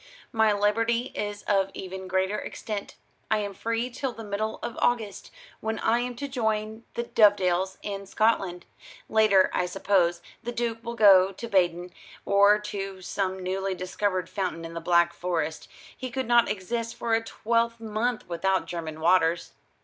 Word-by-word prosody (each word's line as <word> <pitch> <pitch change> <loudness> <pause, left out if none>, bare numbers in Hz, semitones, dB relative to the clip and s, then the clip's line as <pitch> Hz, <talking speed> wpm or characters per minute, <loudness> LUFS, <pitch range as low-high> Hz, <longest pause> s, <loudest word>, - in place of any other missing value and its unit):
"My 220 -1 +3
liberty 230 +4 +1
is 205 0 -4
of 195 -2 +2
even 190 0 -6
greater 190 +2 0
extent. 210 -2 -6 0.3
I 220 - +3
am 205 -1 -3
free 230 +4 -2
till 255 +1 -3
the 225 - -9
middle 215 +1 -3
of 235 - -4
August, 225 -5 0 0.3
when 220 0 -2
I 230 +2 +2
am 245 0 -3
to 280 +4 -4
join 220 -3 -2
the 235 - -1
Dovedales 190 -5 +3
in 200 -1 -5
Scotland. 195 -4 +1 0.4
Later, 215 -4 +4
I 180 - +1
suppose, 175 -2 +1 0.2
the 240 - -4
Duke 235 -1 -2
will 235 0 -5
go 195 -4 +7
to 235 +5 -7
Baden, 180 -3 +1 0.3
or 200 +1 +5
to 195 -2 -6
some 190 0 -2
newly 190 +1 -2
discovered 185 0 -2
fountain 180 -5 -3
in 165 - -8
the 170 - -5
Black 170 0 +3
Forest. 165 -3 -2 0.3
He 255 - -5
could 260 +2 -3
not 240 0 +5
exist 230 +4 -3
for 235 -1 -2
a 225 - +3
twelvemonth 230 0 -1
without 190 +3 0
German 160 -2 -6
waters." 170 0 +3
205 Hz, 160 wpm, -27 LUFS, 185-230 Hz, 0.4 s, go